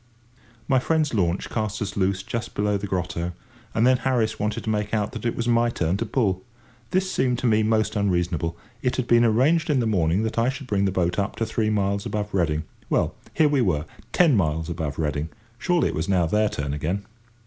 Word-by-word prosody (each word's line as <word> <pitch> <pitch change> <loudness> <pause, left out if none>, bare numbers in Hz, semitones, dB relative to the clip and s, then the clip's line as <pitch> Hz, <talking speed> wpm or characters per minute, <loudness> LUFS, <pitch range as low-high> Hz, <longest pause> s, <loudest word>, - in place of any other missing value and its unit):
My 130 - +4
friends' 155 +1 +1
launch 90 -4 0
cast 110 -1 -2
us 100 -3 -3
loose 95 0 0
just 115 +2 -5
below 105 0 +1
the 100 +1 -3
grotto, 90 -2 -2 0.4
and 115 - +3
then 130 0 +5
Harris 120 -4 0
wanted 105 +1 -2
to - - -3
make 105 0 -1
out 105 0 -1
that 120 -2 -4
it 115 - -1
was 115 - -2
my 120 0 +3
turn 85 -6 0
to 115 +2 -3
pull. 100 -7 0 0.5
This 185 0 0
seemed 125 -2 +1
to 125 - -4
me 110 -2 +4
most 110 0 +1
unreasonable. 85 -4 0 0.2
It 125 - 0
had 130 - -1
been 120 0 +5
arranged 140 +9 +3
in 145 -3 +3
the 120 - +1
morning 95 -2 +2
that 110 +1 -1
I 115 +2 +3
should 135 +1 -5
bring 100 -5 +1
the 95 - +1
boat 90 0 0
up 100 +1 -1
to 115 - -1
three 110 -1 0
miles 100 -1 0
above 105 -1 -3
Reading. 80 -5 +1 0.3
Well, - - +1 0.2
here 155 - +5
we 145 -3 +2
were, 85 -8 +1 0.3
ten 165 -7 +4
miles 80 -3 0
above 80 -4 -3
Reading! 75 0 -1 0.3
Surely 175 +2 +2
it - - -4
was 80 +5 -2
now 90 -3 +3
their 105 +5 +2
turn 70 -5 -3
again. 85 +8 -2
105 Hz, 220 wpm, -24 LUFS, 90-120 Hz, 0.5 s, then